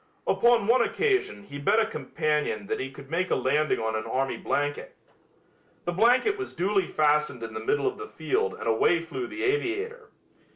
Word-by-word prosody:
Upon 235 -3 +3
one 240 +3 +4
occasion 400 - 0
he 145 -8 -8
bet 180 +10 +3
a 225 - +3
companion 150 -9 -2
that - - -2
he 135 - -3
could 140 +1 -13
make 180 +3 0
a - - +2
landing 150 +4 +1
on 110 0 -1
an 110 - -3
army 135 +1 -1
blanket. 145 0 -2 0.9
The 175 - 0
blanket 245 - +3
was 385 - -6
duly 195 +1 +1
fastened 150 -5 +1
in 110 -1 -6
the - - -4
middle 435 +2 0
of 400 +1 -1
the 425 - -6
field 435 +2 -1
and - - -8
away 115 +9 +3
flew 355 - -5
the 330 0 -6
aviator. 430 +3 -1
195 Hz, 190 wpm, -27 LUFS, -, 0.9 s, one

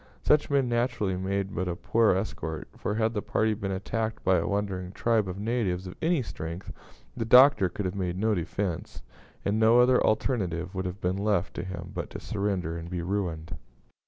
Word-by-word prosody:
Such 150 0 +3
men 140 -3 +2
naturally 120 -5 0
made 95 +1 -2
but 90 +1 -2
a 85 - -2
poor 110 +2 +3
escort; 80 -5 -4
for, 105 - -2
had 110 0 +1
the 105 - -1
party 110 +1 +1
been 100 -2 -4
attacked 110 +4 -3
by 95 -1 +4
a - - -2
wandering 95 -3 -2
tribe 115 -3 +1
of 90 0 -5
natives 100 -4 -1
of 90 - -7
any 165 -4 +2
strength, 85 -3 -6 0.4
the - - -2
Doctor 125 -4 +7
could 100 +3 -4
have 90 - -1
made 90 -3 -2
no 110 +2 +2
defence, 85 -5 -3 0.4
and 105 +2 +1
no 115 +2 +6
other 125 +1 +5
alternative 95 -6 0
would 95 -1 -3
have 90 +3 -5
been 90 +1 0
left 100 -3 0
to - - -4
him 95 -1 -6
but - - -4
to - - -7
surrender 95 -5 -2
and 85 +1 -8
be 90 -1 -3
ruined. 85 -4 -2
100 Hz, 195 wpm, -28 LUFS, 90-110 Hz, 0.4 s, Doctor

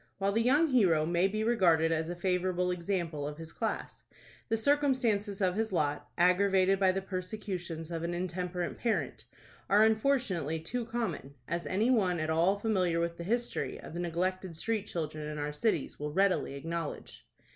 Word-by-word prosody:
While 195 0 +1
the 225 +3 +2
young 290 +7 +4
hero 180 - +4
may 175 +3 +2
be 215 +2 -2
regarded 170 -8 +3
as 160 0 0
a 175 - -3
favorable 180 0 0
example 170 -5 -2
of 150 0 -6
his 165 0 -9
class, 225 -2 -3 0.5
the 225 - +2
circumstances 235 -7 +1
of 185 -1 +2
his 220 +2 -1
lot, 150 -5 -1
aggravated 190 +2 +4
by 190 -1 +4
the 190 +1 -3
persecutions 185 -4 -5
of 165 -1 -3
an 170 +1 -2
intemperate 180 0 -3
parent, 155 - -1 0.4
are 210 +2 +6
unfortunately 220 - +1
too 235 +9 -4
common, 185 - -3
as 170 +2 -3
any 215 +7 +2
one 185 -8 +2
at 155 0 -1
all 170 +5 +3
familiar 185 -6 +1
with 170 0 -1
the 170 - -5
history 235 +6 -2
of - - -10
the 170 - -4
neglected 175 0 -2
street 215 +2 -1
children 155 -2 -4
in 150 0 -5
our 150 0 -3
cities 165 -2 -1
will 150 0 -3
readily 190 -4 +1
acknowledge. 165 +2 -5
180 Hz, 175 wpm, -31 LUFS, 165-210 Hz, 0.5 s, are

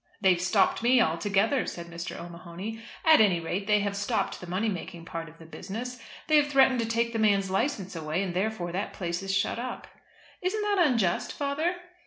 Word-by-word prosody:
"They've 185 -3 +3
stopped 185 +3 +2
me 245 +2 +5
altogether," 205 - +2
said 170 - -6
Mr. 170 +1 -6
O'Mahony. 175 +6 -7 0.2
"At 315 -6 +7
any 190 -5 +4
rate 180 +4 -3
they 210 -1 +4
have 200 0 -2
stopped 200 0 -1
the 180 - -8
money 190 +5 0
making 170 -4 -5
part 165 -1 -6
of 160 - -17
the 165 - -13
business. 230 +9 -6 0.3
They 310 - +4
have 295 -1 +4
threatened 265 -3 +4
to 230 - 0
take 230 +1 0
the 225 - -1
man's 200 -3 +2
license 195 -3 -1
away, 160 +3 -2
and 185 -3 -3
therefore 185 -2 -1
that 190 +3 -3
place 175 -1 -3
is 195 0 -3
shut 195 +4 0
up." 250 +1 -5 0.6
"Isn't 385 +4 -1
that 400 -5 +3
unjust, 215 -9 +1
father?" 300 +5 -1
200 Hz, 200 wpm, -28 LUFS, 175-240 Hz, 0.6 s, At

